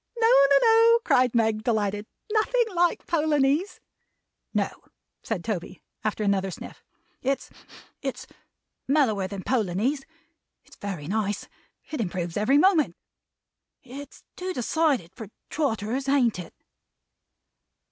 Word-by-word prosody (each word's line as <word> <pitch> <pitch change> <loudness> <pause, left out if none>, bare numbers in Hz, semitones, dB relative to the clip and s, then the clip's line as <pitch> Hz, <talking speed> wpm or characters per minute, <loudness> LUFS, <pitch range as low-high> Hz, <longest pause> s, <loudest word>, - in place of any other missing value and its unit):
"No, 455 -1 +4
no, 275 - +6
no!" 460 +1 +6
cried 250 - +3
Meg, 220 -2 +2
delighted. 210 -2 0 0.3
"Nothing 475 +3 +3
like 350 0 +1
Polonies!" 300 +2 +1 0.7
"No," - - 0 0.5
said 205 -7 -3
Toby, 190 -4 -5 0.2
after 215 0 -1
another 195 -1 +1
sniff. - - -10 0.4
"It's 270 +1 -2 0.5
it's - - -4 0.6
mellower 240 -9 +2
than 195 -1 -7
Polonies. 240 +4 0 0.6
It's - - -17
very 190 -7 -5
nice. 205 +2 -2 0.4
It 300 - -2
improves 175 -4 -3
every 215 +7 +3
moment. 335 -1 +3 0.9
It's 275 +2 -10
too 370 0 -4
decided 265 - 0
for 220 0 -8 0.2
Trotters. 260 -2 -1
Ain't 250 -8 +2
it?" 170 - -9
245 Hz, 115 wpm, -26 LUFS, 205-300 Hz, 0.9 s, no